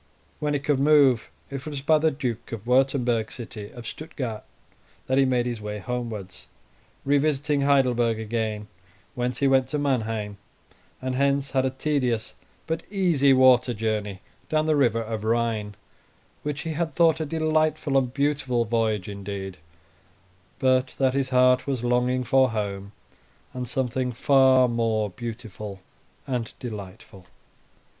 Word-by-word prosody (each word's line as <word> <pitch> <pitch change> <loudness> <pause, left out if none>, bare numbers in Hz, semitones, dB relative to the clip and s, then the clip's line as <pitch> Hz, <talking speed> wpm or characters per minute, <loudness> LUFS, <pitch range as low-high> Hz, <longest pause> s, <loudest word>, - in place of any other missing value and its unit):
When 150 -1 0
he - - +1
could 140 -1 0
move, 140 -4 +4 0.2
it 135 -1 -5
was 145 -3 -4
by 155 +1 +4
the 160 +1 +3
Duke 130 -6 -4
of 115 -2 -6
Wurtemberg's 125 -3 +1
city 110 -4 -8
of 120 - -10
Stuttgard 125 -6 -5 0.6
that 130 +1 +2
he 135 - +5
made 125 -2 +1
his 120 -3 -3
way 105 0 -4
homewards, 110 -4 -5 0.6
revisiting 145 0 +1
Heidelberg 125 -5 +3
again, 110 -1 -3 0.5
whence 125 0 -2
he 140 - +2
went 135 -1 +3
to 150 - -2
Manheim, 115 -7 -1 0.7
and 130 0 -1
hence 140 +1 +1
had 130 -1 +1
a - - +2
tedious 130 -4 -1 0.3
but 160 0 -2
easy 175 -9 +3
water 130 -2 +5
journey 105 -3 -2 0.3
down 155 0 +1
the 155 -1 +2
river 115 -5 +2
of 110 -1 -5
Rhine, 110 -2 0 0.7
which 145 0 -3
he 165 - -4
had 160 +1 -2
thought 165 -2 +4
a - - 0
delightful 155 -2 0
and 130 -2 +2
beautiful 140 -3 0
voyage 110 -3 0
indeed, 100 -2 -6 1.0
but 130 0 +2
that 130 -1 +2
his 135 -1 0
heart 125 0 +4
was 130 -4 -2
longing 125 +1 +1
for 130 +1 +3
home, 100 -3 -4 0.6
and 125 -2 -5
something 130 -1 -1
far 130 0 +5
more 115 -3 0
beautiful 110 -3 -7 0.5
and 125 -4 -3
delightful. 100 -4 -9
125 Hz, 145 wpm, -25 LUFS, 110-140 Hz, 1.0 s, he